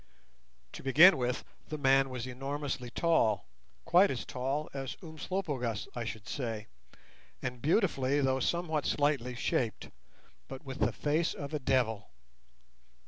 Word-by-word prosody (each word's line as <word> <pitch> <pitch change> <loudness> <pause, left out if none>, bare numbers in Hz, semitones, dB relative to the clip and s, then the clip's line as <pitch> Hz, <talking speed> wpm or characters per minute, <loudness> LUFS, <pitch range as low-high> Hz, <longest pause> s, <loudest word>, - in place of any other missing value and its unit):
To - - -8
begin 155 +8 +8
with, 125 -1 -1 0.3
the 155 - -3
man 135 -1 +4
was 125 -2 -4
enormously 135 0 -4
tall, 115 -7 +2 0.4
quite 180 +4 +6
as 130 - -3
tall 135 +4 -2
as 135 -1 -5
Umslopogaas, 155 - -3
I 120 -1 -3
should 110 -2 -6
say, 115 -5 -3 0.8
and 125 -2 -4
beautifully, 145 - +2
though 130 -1 +2
somewhat 160 +1 0
slightly, 140 -4 +1
shaped; 120 -2 -1 0.6
but 135 +2 -9
with 135 0 -6
the - - +2
face 155 +3 0
of 140 +1 -6
a 150 - 0
devil. 125 -6 0
135 Hz, 135 wpm, -31 LUFS, 125-150 Hz, 0.8 s, begin